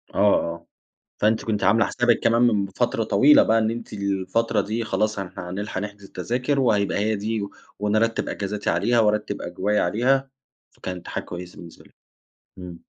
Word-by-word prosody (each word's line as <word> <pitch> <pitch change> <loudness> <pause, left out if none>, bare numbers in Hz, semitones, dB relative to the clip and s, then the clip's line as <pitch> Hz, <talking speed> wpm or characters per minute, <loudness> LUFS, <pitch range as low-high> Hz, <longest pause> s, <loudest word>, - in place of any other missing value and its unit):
آه، - - -1 0.3
آه 85 0 -13 0.6
فأنتِ 110 +1 +2
كنتِ 105 -2 -1
عاملة 110 +4 +4
حسابِك 120 -1 +2
كمان 115 +1 +2
من 105 -5 +3
فترة 115 +3 -1
طويلة 130 +8 +6
بقى 115 - +3
إن 110 0 +1
أنتِ 115 -1 -7
الفترة 100 +2 0
دي 110 +3 -3
خلاص 110 -1 -1
ه 95 -2 -5
هنلحق 95 +2 -4
نحجز 105 -1 -7
التذاكر 125 +10 -2
وهيبقى 105 -6 +2
هي 110 +2 +1
دي، 110 +2 -2
و 100 0 -5 0.3
ونرتّب 110 +2 0
أجازاتي 100 +1 -3
عليها 105 +8 +2
وأرتّب 105 -1 0
أجوائي 95 +4 -1
عليها، 130 +8 +1 0.4
فكانت 90 -2 -7
حاجة - - -4
كويّسة 90 0 -9
بالنسبة 85 -1 -13
لِك، - - -23 0.6
إمم. 90 -2 -10
105 Hz, 165 wpm, -23 LUFS, 100-115 Hz, 0.6 s, طويلة